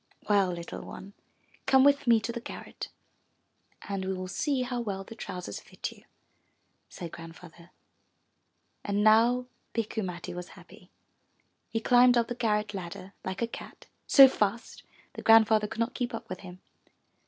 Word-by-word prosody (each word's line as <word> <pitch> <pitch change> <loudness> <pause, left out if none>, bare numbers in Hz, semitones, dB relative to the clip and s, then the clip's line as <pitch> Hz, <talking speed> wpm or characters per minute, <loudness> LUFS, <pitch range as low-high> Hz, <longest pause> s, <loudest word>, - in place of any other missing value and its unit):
'Well, 200 -3 +3
little 170 -1 -6
one, 200 +1 -10 0.5
come 265 -1 +6
with 280 -2 +4
me 230 -1 +6
to 230 - -3
the 235 - -5
garret - - -8 0.9
and 195 -1 -4
we 190 0 -2
will 185 0 -5
see 255 +7 -1
how 245 -1 -3
well 195 -4 -4
the 210 - -11
trousers 180 - -6
fit - - -7
you,'' - - -17 0.8
said 170 -2 -8
Grand 165 0 -10
father. 170 0 -15 1.1
And 205 0 0
now 230 +3 +5 0.3
Bikku 220 -1 -1
Matti 175 -2 -5
was 180 0 -7
happy. - - -16 0.8
He 225 - -1
climbed 245 +1 +5
up 235 -1 +1
the - - -1
garrett 210 -3 0
ladder 185 +1 -7
like 190 +4 -3
a - - 0
cat, 235 - -10 0.2
so 270 -1 +10
fast 215 -3 -2 0.3
that - - -7
Grandfather 220 -1 +6
could 220 - -8
not 230 +3 0
keep 245 -2 -3
up - - -8
with 185 - -5
him. 185 -1 -11
210 Hz, 165 wpm, -29 LUFS, 185-235 Hz, 1.1 s, so